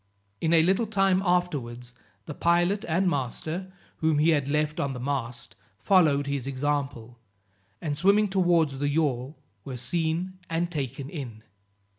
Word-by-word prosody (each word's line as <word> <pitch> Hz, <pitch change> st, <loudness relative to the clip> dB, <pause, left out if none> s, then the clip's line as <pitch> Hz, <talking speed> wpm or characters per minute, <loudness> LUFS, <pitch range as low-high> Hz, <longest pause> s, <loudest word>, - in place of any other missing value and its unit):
In 160 Hz, -, +1 dB
a 165 Hz, -1 st, +6 dB
little 190 Hz, +6 st, +2 dB
time 195 Hz, -2 st, +2 dB
afterwards, 140 Hz, -10 st, -1 dB, 0.3 s
the -, -, -6 dB
pilot 175 Hz, +6 st, +2 dB
and 175 Hz, +4 st, +1 dB
master, 160 Hz, +5 st, -3 dB, 0.3 s
whom 160 Hz, -2 st, +1 dB
he 155 Hz, +3 st, +4 dB
had 145 Hz, -4 st, +2 dB
left 150 Hz, +1 st, 0 dB
on 140 Hz, -1 st, -1 dB
the 125 Hz, -, -6 dB
mast, 125 Hz, -3 st, -4 dB, 0.2 s
followed 150 Hz, -, +3 dB
his 140 Hz, -2 st, -3 dB
example, 135 Hz, -4 st, -3 dB, 0.6 s
and 150 Hz, -3 st, -2 dB
swimming 200 Hz, +6 st, +4 dB
towards 175 Hz, -7 st, +2 dB
the 145 Hz, 0 st, 0 dB
yawl 145 Hz, -2 st, -1 dB, 0.3 s
were 130 Hz, -2 st, -6 dB
seen 170 Hz, +7 st, -2 dB
and 170 Hz, +1 st, -1 dB
taken 135 Hz, -3 st, -4 dB
in. 125 Hz, -8 st, -7 dB
150 Hz, 145 wpm, -27 LUFS, 135-175 Hz, 0.6 s, a